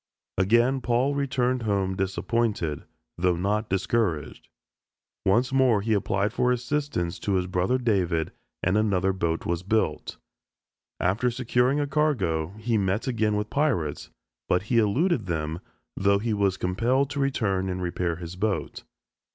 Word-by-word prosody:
Again 120 +7 +3
Paul 125 +4 +1
returned 130 -3 0
home 100 -3 0
disappointed, 95 -4 -1 0.3
though 90 0 +2
not 105 +5 -1
discouraged. 95 -5 -1 0.8
Once 120 +7 +3
more 130 -6 +4
he 110 +2 0
applied 100 +1 0
for 125 0 +2
assistance 125 - -2
to 100 - -1
his 90 -1 +1
brother 90 +7 +1
David 90 -10 0 0.3
and 95 +4 +2
another 95 -3 +1
boat 85 -3 -2
was 85 0 -1
built. 110 +4 -1 0.8
After 105 +8 +1
securing 125 +2 +1
a 145 - +1
cargo, 100 - 0
he 110 0 0
met 100 +2 0
again 110 -4 +1
with 105 0 -2
pirates, 125 - 0 0.4
but 90 +1 +2
he 115 +2 +2
eluded 120 - +1
them 80 -1 -2 0.4
though 100 0 +3
he 110 +2 -1
was 100 -2 +1
compelled 125 +9 +1
to 145 - -3
return 100 -9 0
and 90 0 -3
repair 85 -1 -2
his 85 +1 -8
boat. 100 +2 -2
105 Hz, 145 wpm, -26 LUFS, 90-125 Hz, 0.8 s, more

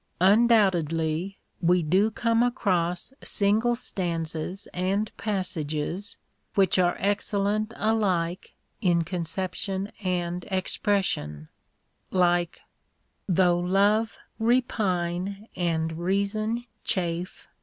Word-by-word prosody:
Undoubtedly 185 -5 +3 0.2
we 175 0 +3
do 190 +7 +3
come 230 +1 +1
across 185 -5 0
single 220 +4 +2
stanzas 170 -4 -3
and 195 +4 -1
passages 180 -2 -3 0.4
which 190 -2 +3
are 175 -1 +3
excellent 205 +2 0
alike 190 -5 0 0.3
in 170 -3 +3
conception 185 +3 -3
and 175 -1 -1
expression, 185 - -1 0.6
like: 175 -2 +1 0.7
Though 180 -1 +4
love 200 +5 +2 0.2
repine, 200 -5 0
and 165 -2 0
reason 205 +6 -1 0.2
chafe. 175 -2 -2
185 Hz, 80 wpm, -26 LUFS, 175-205 Hz, 0.7 s, Though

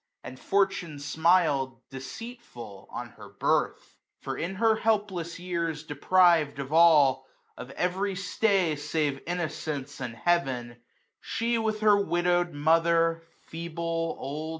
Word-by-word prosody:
And 130 +1 -9
fortune 195 -5 0
smil'd, 150 -3 +2 0.2
deceitful,, 135 - -9
on - - -6
her - - -14
birth; - - -1 0.2
For, - - -5
in 175 +4 -4
her 220 +2 +3
helpless 205 -7 -1
years 170 -4 -3
deprived 160 0 +3
of 140 +1 -5
all. 145 -6 +5 0.3
Of 125 - -9
every 190 +2 -1
stay, 195 -3 +1
save 145 -2 -2
Innocence 155 -5 -4
and 120 -2 -5
Heavek^ 135 -5 0
iSo 120 - -18 0.4
She, 230 0 -1
with 215 -1 -2
her 205 -1 +4
widoW'd 175 0 +1
mother, 165 +2 +2 0.2
feeble, 165 0 -4
old. 150 +4 -5
165 Hz, 125 wpm, -27 LUFS, 145-185 Hz, 0.4 s, all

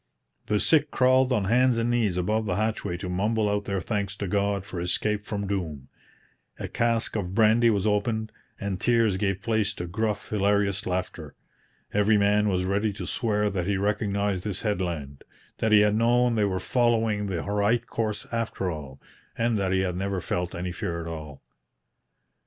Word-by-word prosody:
The 105 -1 +1
sick 150 +3 +3
crawled 130 0 +3
on 110 -5 +2
hands 120 +4 +3
and 115 +1 +1
knees 110 -7 +1
above 110 +5 0
the 90 - 0
hatchway 110 -4 -1
to 90 - -6
mumble 105 +4 0
out 105 0 -1
their 100 -1 -1
thanks 100 +1 -2
to 100 -1 -4
God 100 0 0
for 90 - -6
escape 105 +4 -1
from 100 -1 -3
doom. 80 -9 -4 0.7
A - - -5
cask 115 -1 0
of 95 -3 -3
brandy 115 +2 +5
was 105 -2 +1
opened, 110 +1 0 0.3
and 100 -2 -3
tears 115 -5 +3
gave 95 -1 -1
place 110 -3 0
to 90 - -5
gruff, 105 +4 -2
hilarious 100 -1 +1
laughter. 90 0 -4 0.6
Every 105 +1 +4
man 105 +1 +3
was 90 -1 0
ready 100 +3 +1
to 105 - -6
swear 105 -3 0
that 90 -2 -2
he 100 -1 +1
recognized 100 -1 0
this 105 -2 -3
headland, 85 -10 -3 0.4
that 110 - +1
he 105 -1 +7
had 105 0 +3
known 120 +2 +3
they 110 -2 +2
were 95 -2 -1
following 115 -4 +1
the 90 -4 -3
right 105 +3 +1
course 110 -2 -3
after 115 -5 -2
all, 70 -4 -8 0.4
and 115 0 +1
that 95 -1 0
he 95 0 +2
had 90 -2 -1
never 95 +1 -2
felt 90 0 -3
any 90 +1 -3
fear 85 0 -3
at 85 - -6
all. 75 -4 -8
105 Hz, 180 wpm, -26 LUFS, 95-110 Hz, 0.7 s, he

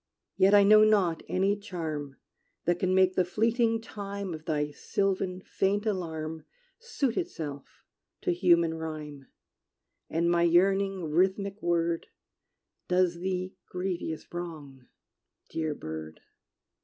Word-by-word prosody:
Yet 195 +1 +5
I 205 - +7
know 215 +1 +7
not 195 -7 +3
any 195 +2 +2
charm 160 -9 -5 0.5
That 175 0 +1
can 185 0 +1
make 185 0 +4
the 185 - +3
fleeting 225 +5 +1
time 200 -3 -5
Of 155 0 -8
thy 150 -2 -1
sylvan, 185 +3 -1
faint 205 +2 0
alarm 160 -6 -3 0.4
Suit 445 - -2
itself 150 - -5 0.4
to - - +1
human 170 -2 +3
rhyme: 155 -3 -6 0.8
And 165 +1 +1
my 170 0 +3
yearning 195 +2 +3
rhythmic 195 +4 +1
word, 170 -1 0 0.8
Does 180 -1 +2
thee 185 0 -2 0.2
grievous 180 -3 -3
wrong, 150 -7 -7 0.6
dear 155 -2 -2
bird. 80 - -7
180 Hz, 120 wpm, -29 LUFS, 160-195 Hz, 0.8 s, I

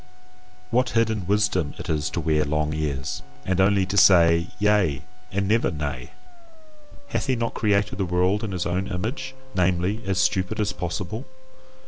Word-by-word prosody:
What 125 +1 +2
hidden 110 -5 +1
wisdom 105 -7 +1
it - - -7
is 75 -1 -1
to - - -3
wear 75 -1 +1
long 75 +1 -1
ears, 75 -1 -3 0.2
and 95 0 +1
only 95 0 +3
to 95 +2 -4
say 85 -3 +6
Yea 100 -9 +2 0.3
and 100 0 -1
never 115 +3 +2
Nay! 70 -5 -4 1.0
Hath - - -2
he 130 - +2
not 115 -1 -2
created 105 -2 0
the 95 - +1
world 90 +4 +1
in 110 - -3
his 90 -2 -2
own 90 +2 -1
image, 120 +8 -4 0.2
namely, 90 +4 +1
as 95 -1 0
stupid 95 +3 +1
as 105 -1 0
possible? 95 +7 -4
95 Hz, 160 wpm, -24 LUFS, 85-105 Hz, 1.0 s, say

